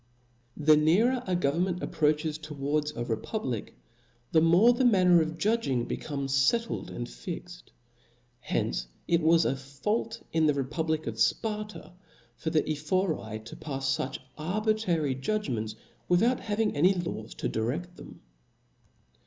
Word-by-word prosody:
TH 150 Hz, -, -7 dB
E 150 Hz, -, +3 dB
nearet 225 Hz, +11 st, +3 dB
a 185 Hz, -, +1 dB
government 175 Hz, +3 st, 0 dB
approaches 150 Hz, 0 st, 0 dB
towards 150 Hz, 0 st, -2 dB
a -, -, -8 dB
b -, -, -6 dB
o -, -, 0 dB
o -, -, -6 dB
c -, -, -11 dB
republic^ 120 Hz, -, -3 dB, 0.6 s
the 160 Hz, -, +5 dB
more 175 Hz, +9 st, +6 dB
the 245 Hz, -, 0 dB
manner 185 Hz, -7 st, +5 dB
of 160 Hz, +1 st, -3 dB
j^dging^^jj^p^' 200 Hz, -, 0 dB
becomes 140 Hz, -3 st, -3 dB
fettled 225 Hz, +13 st, +1 dB
and 120 Hz, -, -5 dB
fixt; 175 Hz, +4 st, -8 dB, 0.7 s
hence -, -, -2 dB, 0.2 s
ic 170 Hz, 0 st, +3 dB
was 165 Hz, +1 st, +4 dB
a -, -, +1 dB
fault 210 Hz, -, -3 dB
in 160 Hz, -1 st, +3 dB
the 150 Hz, -, +3 dB
republic 155 Hz, +3 st, -1 dB
of 115 Hz, -1 st, -5 dB
Sparta, 210 Hz, -, -1 dB, 0.4 s
for 160 Hz, -, -3 dB
the 155 Hz, -1 st, +2 dB
Ephori 155 Hz, -, -1 dB
to 115 Hz, -, -9 dB
pafs 135 Hz, -2 st, -2 dB
fuch 135 Hz, +1 st, -3 dB, 0.2 s
arbitrary 180 Hz, -4 st, 0 dB
judgments, 130 Hz, -, -2 dB, 0.3 s
without 225 Hz, +8 st, +3 dB
having 215 Hz, 0 st, -1 dB
any 180 Hz, +7 st, +4 dB
laws 170 Hz, -11 st, -5 dB
to -, -, -2 dB
direft 155 Hz, +11 st, -2 dB
them. -, -, -12 dB
160 Hz, 150 wpm, -28 LUFS, 135-190 Hz, 0.7 s, more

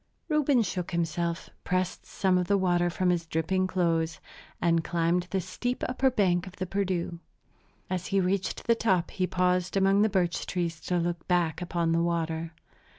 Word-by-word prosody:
Reuben 290 Hz, -5 st, +3 dB
shook 180 Hz, -3 st, -3 dB
himself, 170 Hz, 0 st, -2 dB
pressed 185 Hz, 0 st, -1 dB
some 185 Hz, -2 st, +1 dB
of 180 Hz, -, -1 dB
the 200 Hz, -, +3 dB
water 175 Hz, -2 st, +2 dB
from 180 Hz, +1 st, +1 dB
his 170 Hz, -2 st, -1 dB
dripping 185 Hz, +4 st, 0 dB
clothes, 165 Hz, -3 st, 0 dB, 0.4 s
and 165 Hz, -1 st, +2 dB
climbed 170 Hz, +2 st, 0 dB
the 195 Hz, -, 0 dB
steep 245 Hz, +7 st, -3 dB
upper 260 Hz, +1 st, +2 dB
bank 190 Hz, -7 st, +1 dB
of 185 Hz, -, -10 dB
the 185 Hz, -, -3 dB
Perdu. 180 Hz, -3 st, -2 dB, 0.7 s
As 180 Hz, -1 st, -3 dB
he 195 Hz, -, +2 dB
reached 190 Hz, +1 st, -1 dB
the 235 Hz, -, +5 dB
top 190 Hz, -6 st, +1 dB
he 185 Hz, -2 st, -1 dB
paused 180 Hz, 0 st, +1 dB
among 195 Hz, +1 st, +4 dB
the 215 Hz, -, +4 dB
birch 180 Hz, -4 st, 0 dB
trees 170 Hz, -3 st, -2 dB
to 180 Hz, -, +1 dB
look 170 Hz, -1 st, -2 dB
back 175 Hz, -2 st, +1 dB
upon 170 Hz, -2 st, 0 dB
the 165 Hz, 0 st, +2 dB
water. 165 Hz, -1 st, -2 dB
180 Hz, 175 wpm, -28 LUFS, 170-190 Hz, 0.7 s, the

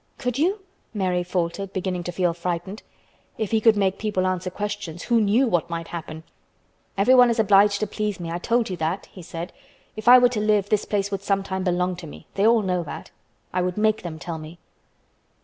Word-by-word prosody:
"Could 250 Hz, 0 st, -2 dB
you?" 380 Hz, +6 st, +1 dB, 0.3 s
Mary 185 Hz, -3 st, 0 dB
faltered, 180 Hz, +2 st, -3 dB
beginning 185 Hz, -1 st, -2 dB
to 175 Hz, -, -3 dB
feel 175 Hz, -1 st, 0 dB
frightened. 175 Hz, +4 st, -4 dB, 0.6 s
If 220 Hz, -3 st, -3 dB
he 220 Hz, -1 st, +2 dB
could 220 Hz, -1 st, +5 dB
make 195 Hz, -1 st, +1 dB
people 205 Hz, -4 st, -1 dB
answer 185 Hz, 0 st, -1 dB
questions, 205 Hz, -3 st, -5 dB
who 235 Hz, -2 st, +2 dB
knew 215 Hz, +6 st, +3 dB
what 175 Hz, -5 st, 0 dB
might 165 Hz, 0 st, -5 dB
happen! 160 Hz, -2 st, -7 dB, 0.7 s
"Everyone 245 Hz, +4 st, +6 dB
is 235 Hz, -, 0 dB
obliged 205 Hz, -1 st, +4 dB
to -, -, +2 dB
please 210 Hz, -1 st, -3 dB
me. 165 Hz, -1 st, -5 dB
I 170 Hz, -, -3 dB
told 230 Hz, +2 st, 0 dB
you 180 Hz, -, -3 dB
that," 170 Hz, +4 st, -2 dB
he 185 Hz, -, -11 dB
said. 165 Hz, +1 st, -7 dB, 0.4 s
"If 215 Hz, +1 st, -8 dB
I 250 Hz, +1 st, +10 dB
were 245 Hz, -1 st, +5 dB
to 240 Hz, -3 st, -2 dB
live, 210 Hz, -2 st, +2 dB
this 210 Hz, -1 st, +1 dB
place 200 Hz, -1 st, -1 dB
would 195 Hz, -1 st, -2 dB
sometime 195 Hz, -1 st, -1 dB
belong 180 Hz, 0 st, 0 dB
to 170 Hz, -, -9 dB
me. -, -, -12 dB
They 200 Hz, +2 st, +2 dB
all 230 Hz, -2 st, +4 dB
know 180 Hz, -2 st, 0 dB
that. 160 Hz, -, -8 dB, 0.4 s
I 180 Hz, -, +1 dB
would 180 Hz, +1 st, -2 dB
make 215 Hz, 0 st, +2 dB
them 165 Hz, -3 st, -6 dB
tell 165 Hz, -1 st, -6 dB
me." 155 Hz, +2 st, -10 dB
195 Hz, 210 wpm, -24 LUFS, 175-215 Hz, 0.7 s, I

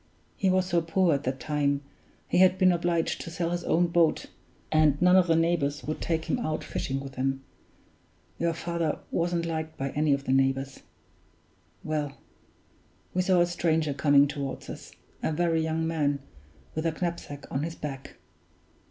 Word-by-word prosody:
He 195 Hz, -, +1 dB
was 185 Hz, 0 st, +3 dB
so 175 Hz, -2 st, +1 dB
poor 170 Hz, +1 st, +2 dB
at 140 Hz, 0 st, -2 dB
that 130 Hz, +1 st, -2 dB
time, 145 Hz, +1 st, 0 dB, 0.4 s
he -, -, +2 dB
had 185 Hz, 0 st, +6 dB
been 185 Hz, -1 st, +5 dB
obliged 170 Hz, -1 st, 0 dB
to -, -, -6 dB
sell 170 Hz, 0 st, -2 dB
his 175 Hz, 0 st, -2 dB
own 175 Hz, +2 st, +3 dB
boat, 170 Hz, -2 st, +2 dB, 0.5 s
and 155 Hz, -2 st, +4 dB
none 180 Hz, +1 st, +5 dB
of 185 Hz, -1 st, +5 dB
the 165 Hz, -, +4 dB
neighbors 160 Hz, -4 st, +1 dB
would 155 Hz, -, -4 dB
take 160 Hz, -1 st, -1 dB
him 255 Hz, -, 0 dB
out 155 Hz, -8 st, -2 dB
fishing 135 Hz, 0 st, -3 dB
with 135 Hz, 0 st, -7 dB
them 135 Hz, +1 st, -2 dB, 1.0 s
your 170 Hz, 0 st, +1 dB
father 170 Hz, -2 st, -2 dB
wasn't 170 Hz, 0 st, 0 dB
liked 160 Hz, -1 st, -4 dB
by 135 Hz, 0 st, -2 dB
any 150 Hz, 0 st, +1 dB
of 140 Hz, 0 st, -1 dB
the 130 Hz, -, -2 dB
neighbors. 135 Hz, 0 st, +1 dB, 1.0 s
Well; 150 Hz, -2 st, -2 dB, 1.0 s
we 185 Hz, -, +2 dB
saw 185 Hz, -1 st, +3 dB
a -, -, +5 dB
stranger 160 Hz, -3 st, 0 dB
coming 145 Hz, 0 st, +5 dB
toward 140 Hz, -2 st, -5 dB
us; -, -, -10 dB, 0.3 s
a -, -, 0 dB
very 165 Hz, 0 st, +1 dB
young 160 Hz, 0 st, -1 dB
man, 150 Hz, -3 st, +1 dB, 0.6 s
with 160 Hz, +1 st, -1 dB
a -, -, +1 dB
knapsack 170 Hz, -4 st, -4 dB
on 135 Hz, -, -1 dB
his 165 Hz, +2 st, -4 dB
back. 135 Hz, -3 st, -7 dB
160 Hz, 175 wpm, -27 LUFS, 145-170 Hz, 1.0 s, had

